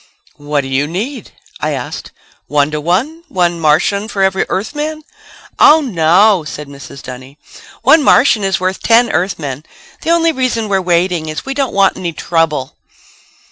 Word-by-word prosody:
'" - - -31
"What 145 -1 +1
do 135 - -7
you 135 +2 0
need?" 210 - -5 0.3
I - - -1
asked. - - -6 0.4
"One 145 0 +1
to 150 0 -3
one? 240 - -1
One 175 -8 0
Martian 165 +7 +1
for 195 -3 -1
every 190 0 0
Earthman?" 300 +9 -3 0.6
"Oh, 310 +2 +7
no," 190 - +3
said 150 -1 -7
Mrs. 140 -1 -11
Dunny, 130 +2 -10 0.5
"one 315 - +6
Martian 245 -6 +4
is 195 -1 0
worth 185 +1 -2
ten 235 0 +3
Earthmen. 160 -6 -2 0.4
The - - -4
only 335 -1 +3
reason 255 -6 -1
we're 195 -1 +1
waiting 175 -2 0
is 155 - -5
we 270 - -3
don't 270 -2 -1
want 195 -1 +3
any 175 -2 -4
trouble." 160 -5 -1
185 Hz, 165 wpm, -15 LUFS, 155-230 Hz, 0.6 s, Oh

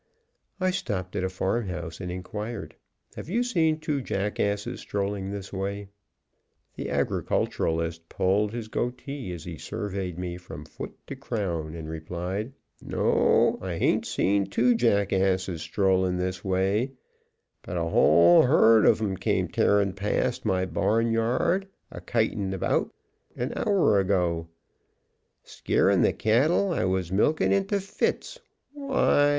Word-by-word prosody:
I 185 0 +2
stopped 100 - -3
at - - -1
a 95 - 0
farm 95 +4 -1
house 85 -1 -6
and 90 -1 -4
inquired: 105 +4 -6 0.4
"Have - - -8
you 235 +6 +1
seen 165 -10 +1
two 150 -3 -2
jackasses 100 -1 -2
strolling 100 -1 -3
this 100 -1 -6
way?" 100 +1 -4 0.9
The - - -5
agriculturist 80 0 -1
pulled 100 +3 +1
his 115 -1 -5
goatee 125 0 -4
as 85 -2 -7
he 85 -3 -8
surveyed 95 -4 -4
me 90 -1 -4
from 90 - -10
foot - - -9
to 140 - -7
crown, 90 - -3
and 80 -2 -7
replied: 90 +8 -4 0.3
"No, - - +2
I - - -4
hain't - - +1
seen 100 0 +1
TWO 120 +5 +3
jackasses 95 -6 +1
STROLLIN' 95 -1 +1
this 90 0 -3
way, 100 +7 0 0.7
but 90 - -5
a 85 - 0
WHOLE 85 +1 +6
HERD 115 -5 +5
of - - +5
'em 100 -3 -1
came - - 0
tearing 100 -2 +2
past 100 +2 -1
my 95 0 +1
barnyard 115 - +1 0.2
a - - -8
kitin' 110 -4 -1
about 95 - 0 0.4
an 125 +4 -3
hour 190 - +3
ago, 90 -4 0 1.0
skeerin' - - +1
the - - +4
cattle 145 - +2
I - - 0
was 95 -2 -1
a - - -3
milkin' 150 +10 +2
into 195 +1 +1
fits. 200 - -2 0.3
Why! 270 - +2
100 Hz, 135 wpm, -26 LUFS, 90-120 Hz, 1.0 s, WHOLE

